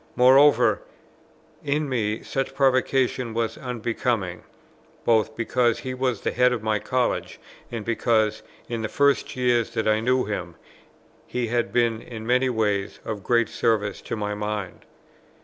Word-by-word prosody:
Moreover, 135 +4 +5 0.8
in 145 +1 0
me 110 -5 -1
such 135 0 -3
provocation 130 -3 +1
was 115 -1 -1
unbecoming, 115 -6 -2 0.6
both 110 -1 +2
because 120 0 +1
he 130 +1 -5
was 130 -4 -1
the - - -1
Head 125 0 +3
of 120 -3 -2
my 110 -1 +1
College, 125 +2 -1 0.3
and 115 -3 -5
because, 110 -2 +1 0.3
in 115 -2 -3
the 110 - -3
first 140 0 +1
years 120 -3 +2
that 110 - 0
I 110 0 +3
knew 125 +3 +1
him, 90 -5 -4 0.7
he 125 -2 -2
had 120 0 0
been 115 -2 +1
in 110 -2 -8
many 125 +2 +2
ways 105 -4 -1
of 105 -2 -4
great 115 +1 +2
service 105 -3 0
to - - -4
my 105 -1 -3
mind. 105 -2 -4
115 Hz, 150 wpm, -24 LUFS, 110-125 Hz, 0.8 s, Moreover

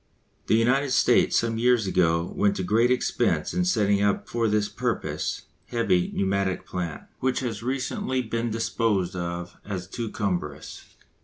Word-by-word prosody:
The - - +4
United 125 +5 +3
States - - +4
some 115 -1 0
years 120 -2 +3
ago 85 -2 +1
went 100 -1 +2
to 95 - -2
great 110 +6 +3
expense 125 -1 +1
in 180 -1 +1
setting 105 - +2
up 100 -1 +1
for 115 -1 0
this 105 -1 +1
purpose - - -2 0.2
heavy 90 -7 +1
pneumatic 95 -1 0
plant, 85 -4 -4 0.2
which 130 0 0
has 115 -5 -3
recently 130 +1 -2
been 115 +1 -2
disposed 110 -4 0
of 85 0 -5
as 95 -3 -5
too 115 +3 -4
cumbrous. 85 -9 -4
105 Hz, 150 wpm, -26 LUFS, 90-120 Hz, 0.2 s, The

